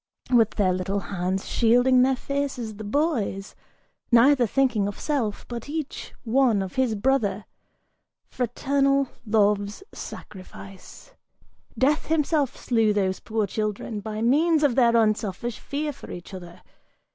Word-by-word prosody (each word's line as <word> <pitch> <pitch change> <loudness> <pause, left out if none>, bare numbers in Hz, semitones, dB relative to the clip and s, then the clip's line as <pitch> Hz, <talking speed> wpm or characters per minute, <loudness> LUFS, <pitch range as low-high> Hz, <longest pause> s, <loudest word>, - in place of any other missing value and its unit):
With 230 -3 +4
their 190 -3 +2
little 185 +2 -2
hands 185 +1 -2
shielding 245 +2 +4
their 265 +1 +3
faces, 265 -5 -4
The 215 - -7
boys, 215 - -1 0.6
neither 245 +1 +5
thinking 235 -4 +1
of 205 - -6
self, 255 -9 -2
but 240 +2 -7
each 305 -1 -5
one 235 -4 +2
of 185 - -7
his 255 -4 +1
brother! 215 -3 0 0.8
Fraternal 275 +2 0 0.2
love's 205 - +1
sacrifice! 195 - -11 0.6
Death 290 +4 +1
himself 300 -3 +1
slew 225 -3 +1
those 190 -2 0
poor 220 -1 -1
children 210 +1 -3
By 215 +1 -5
means 310 +6 +3
of 285 -4 +3
their 235 -2 +4
unselfish 215 +1 0
fear 295 +1 -3
for - - -13
each 175 +3 -9
other! 175 -2 -10
230 Hz, 130 wpm, -25 LUFS, 205-270 Hz, 0.8 s, neither